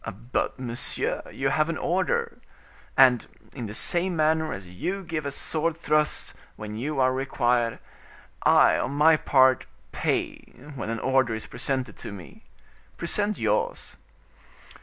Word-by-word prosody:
"But, - - 0
monsieur, 120 -2 -3
you 135 0 -1
have 155 +3 +1
an 165 - -2
order. 465 - 0 0.6
And, 130 -3 +6 0.3
in 120 -5 -5
the 105 - -7
same 175 +6 0
manner 160 0 +2
as 95 -1 -6
you 180 - -4
give 165 -4 -3
a - - -3
sword 160 +3 -1
thrust, 150 -2 +1 0.2
when 105 0 -7
you 140 +5 -3
are 130 0 +3
required, 120 -3 +1 0.6
I, - - +5
on 130 - -2
my 155 +3 +6
part, 130 -4 +3 0.2
pay - - -1 0.4
when 120 -5 -5
an 115 - -2
order 130 -3 +2
is 110 - -6
presented 125 -3 -3
to - - -8
me. 95 -5 -12 0.5
Present 205 +4 -1
yours." - - -1
135 Hz, 140 wpm, -26 LUFS, 120-160 Hz, 0.6 s, And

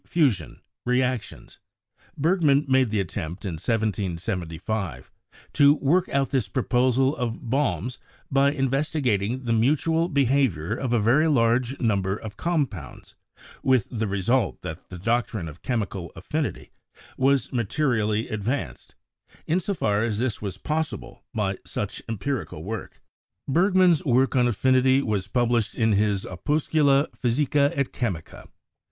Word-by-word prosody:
fusion) 130 - +1 0.2
re 125 +1 +2
actions. 125 -5 -3 0.6
Bergman 150 -3 +3
made 130 -2 +3
the 105 -1 0
attempt 90 0 -4
in 95 - -2
1775 95 -3 -2 0.4
to 145 0 +6
work 160 +6 +1
out 135 -1 0
this 130 -7 +1
proposal 130 +5 +2
of 120 -1 -4
Baume's 125 - -1 0.3
by 140 +1 +4
investigating 135 -5 0
the 115 -2 0
mutual 155 +8 +2
be 140 -4 +2
havior 115 - +1
of 130 -1 -3
a 120 - +3
very 130 +9 +3
large 125 -1 +2
number 100 -5 +1
of 110 -2 -8
compounds, 160 0 -3 0.5
with 130 -5 +2
the 110 -2 -2
re 100 0 -2
sult 120 +6 +1
that 85 -1 -7
the 90 - -8
doctrine 115 -2 -1
of 80 +1 -10
chemical 100 -8 -3
affinity 150 - -4 0.4
was 135 -1 +1
materially 115 -3 0
advanced, 110 +6 -4 0.5
in 170 +4 +1
so 195 +2 -2
far 105 - +1
as 110 -3 -1
this 120 -1 -1
was 100 -3 -4
possible 155 +8 -3
by 100 -5 -2
such 105 - -4
empirical 115 - -3
work. 110 +4 -6 0.5
Bergman's 180 +2 +4
work 130 -1 +2
on 125 -1 +4
affinity 130 +3 +3
was 100 -5 -1
published 120 -1 +1
in 110 -1 +2
his 100 -1 +1
'Opus 145 - -2
cula 145 -2 +4
physica 140 +3 +1
et 140 -1 -1
chemica.' 95 -10 -4
120 Hz, 135 wpm, -25 LUFS, 105-140 Hz, 0.6 s, to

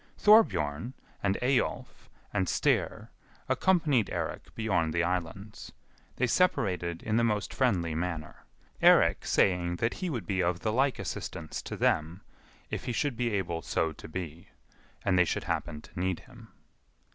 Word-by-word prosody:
Thorbjorn, 125 - +4 0.3
and 100 -1 +1
Eyjolf, 130 0 -1 0.2
and 95 -3 +1
Styr - - 0 0.4
accompanied 150 - +2
Eirik - - -4
beyond 90 -8 0
the 85 - +2
islands. 90 +4 -4 0.4
They 130 - +1
separated 90 - +1
in 110 0 0
the 115 - +3
most 105 -3 0
friendly 90 -11 +1
manner, 80 -1 -4 0.4
Eirik - - +5
saying 90 -2 +2
that 115 +6 0
he 185 -2 -4
would 125 -8 -3
be 95 -2 0
of 90 0 0
the 110 - -1
like 135 0 +2
assistance 80 -1 -5
to - - -6
them, 80 +5 +1 0.5
if - - -4
he - - -2
should 140 +2 0
be 120 0 0
able 85 -4 -2
so 80 0 0
to - - -11
be, 85 +2 -6 0.6
and 90 -2 +3
they - - +7
should - - -2
happen 75 0 -3
to - - -11
need 95 -1 -1
him. 120 -3 -15
95 Hz, 155 wpm, -29 LUFS, 85-120 Hz, 0.6 s, they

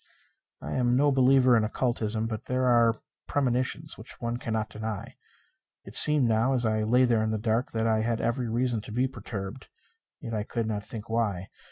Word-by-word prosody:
I - - -6
am 125 -1 +1
no 145 +2 +3
believer 130 -1 +4
in 110 - +3
occultism, 110 -1 -1
but 110 -2 -5
there 130 0 -1
are 120 -2 +4 0.3
premonitions 130 +2 -1
which 110 - -10
one 120 0 -3
cannot 110 -3 -3
deny. 110 -1 -6 0.7
It - - -12
seemed 150 -5 +7
now 115 +4 +2
as 125 -2 +1
I 110 -1 +1
lay 125 +4 +3
there 115 -3 +2
in 110 - 0
the 110 - -1
dark 115 +3 -1
that 110 0 -1
I 110 -1 +2
had 115 0 -1
every 120 +1 -1
reason 120 -1 -1
to 105 - -10
be 125 +4 +1
perturbed, 110 -1 -7 0.5
yet 115 -7 -7
I 105 - -1
could 115 +2 -3
not 105 -2 -3
think 110 -1 -8
why. 105 -5 -2
115 Hz, 195 wpm, -27 LUFS, 110-125 Hz, 0.7 s, seemed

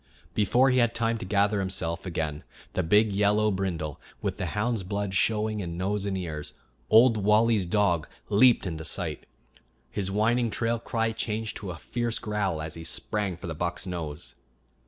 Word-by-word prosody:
Before 125 +6 +3
he 125 - +3
had 120 -1 +2
time 115 0 0
to - - -5
gather 100 +1 +2
himself 95 -2 -2
again 80 -3 -3 0.3
the - - +1
big 105 +5 +4
yellow 105 +2 +3
brindle, 85 -7 -3 0.2
with - - -3
the - - -1
hound's 115 0 +1
blood 100 +1 -3
showing 110 +2 +1
in 85 -3 -4
nose 100 +2 -1
and 95 -1 -1
ears, 80 -5 -5 0.4
Old 115 +1 +6
Wally's 105 -1 +3
dog, 90 -4 +2 0.2
leaped 115 +3 +5
into 80 -3 -4
sight. - - -2 0.6
His 95 +6 -2
whining 115 +4 +2
trail 115 +1 -1
cry 115 -1 -1
changed 110 0 -2
to 100 - -6
a 85 - -5
fierce 120 +6 -2
growl 100 -7 -2
as 80 0 -6
he 80 - -8
sprang 95 +2 -2
for 90 - -9
the 85 - -3
buck's 85 +4 -3
nose. 75 -8 -6
100 Hz, 175 wpm, -27 LUFS, 90-110 Hz, 0.6 s, Old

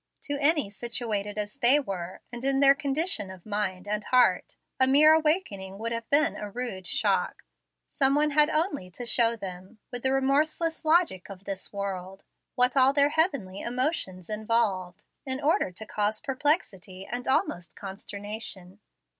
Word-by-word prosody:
To 290 - -1
any 290 -7 +3
situated 210 -2 -3
as 210 +4 -4
they 275 +2 +6
were, 185 -8 -6
and 240 +1 -7
in 270 0 +1
their 275 0 +7
condition 280 - -1
of 190 -2 -12
mind 205 -3 -2
and 210 0 -2
heart, 245 -8 +2 0.2
a 260 - +6
mere 300 +4 +6
awakening 300 - 0
would 230 +2 -4
have 230 -1 -5
been 310 +3 +3
a 210 - -6
rude 200 -5 -5
shock. - - 0 0.5
Some 270 0 +3
one 300 +1 +2
had 300 +1 +4
only 305 - -1
to 240 +7 -8
show 235 0 +3
them, 190 +1 -9
with 245 - -4
the 265 - +1
remorseless 300 +5 0
logic 315 - +2
of 195 -1 -10
this 195 -1 -4
world, 195 -1 -5 0.3
what 250 +1 +3
all 265 0 +5
their 285 0 +4
heavenly 280 - 0
emotions 240 - -2
involved, 210 -4 -1 0.2
in 260 -1 -1
order 300 - +1
to 200 +5 -9
cause 210 0 -1
perplexity 255 - -2
and 245 +4 -5
almost 265 - 0
consternation. 200 -1 -7
235 Hz, 160 wpm, -27 LUFS, 195-280 Hz, 0.5 s, their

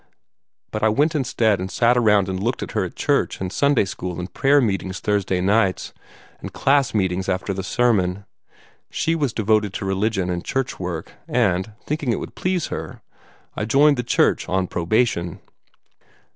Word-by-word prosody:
But 110 - -3
I 110 - +4
went 145 +9 +2
instead 120 - +1
and 95 +1 -4
sat 120 +5 +3
around 105 -5 +3
and 95 0 -3
looked 120 +4 -1
at - - -7
her - - 0
at - - -6
church - - 0
and 95 0 -4
Sunday 140 -6 +3
school 90 -1 -5
and 90 0 -6
prayer 140 +2 +4
meetings 95 -5 -1
Thursday 100 -3 0
nights, 100 0 +1 0.5
and - - -7
class 140 -4 +2
meetings 95 -2 0
after 95 +2 -1
the 95 - -3
sermon. 95 -2 +1 0.6
She 165 - 0
was 145 -6 0
devoted 110 -2 +1
to 100 - -4
religion 95 -1 0
and 85 -1 -3
church 135 -1 -2
work; 90 -3 -5 0.2
and, 95 +5 0
thinking 145 -4 -1
it - - -1
would - - -7
please 185 -3 -1
her, - - -7 0.5
I 105 - -2
joined 140 +5 +4
the 125 - -1
church 120 - +1
on 95 0 +1
probation. 85 -1 0
105 Hz, 170 wpm, -22 LUFS, 95-125 Hz, 0.6 s, I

